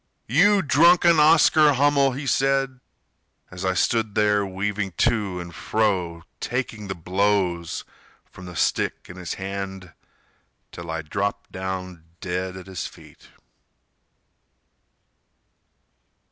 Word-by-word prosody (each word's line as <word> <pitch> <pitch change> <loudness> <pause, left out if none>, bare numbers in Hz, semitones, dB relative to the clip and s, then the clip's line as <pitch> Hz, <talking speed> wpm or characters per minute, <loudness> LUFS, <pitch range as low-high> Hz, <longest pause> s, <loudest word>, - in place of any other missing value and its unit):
"You 195 - +4
drunken 170 +2 +5
Oscar 155 -1 +5
Hummel," 140 0 +3
he 140 +3 -6
said, 135 0 +1 0.7
As 90 0 -7
I 95 0 0
stood 110 +3 0
there 105 -1 +3
weaving 95 0 -3
to 105 -2 0
and 85 -1 -8
fro, 90 -6 -1 0.2
Taking 115 -4 -4
the 95 - -4
blows 90 -1 -1 0.4
from 90 -1 -13
the 90 - -9
stick - - -1
in 90 - -10
his 90 -2 -5
hand 95 -2 -6 0.8
Till 85 -1 -9
I 80 0 -3
dropped 100 +5 -3
down 95 -2 -5 0.2
dead 90 +1 -4
at 95 - -10
his 95 -2 -5
feet. - - -17
100 Hz, 115 wpm, -23 LUFS, 90-130 Hz, 0.8 s, drunken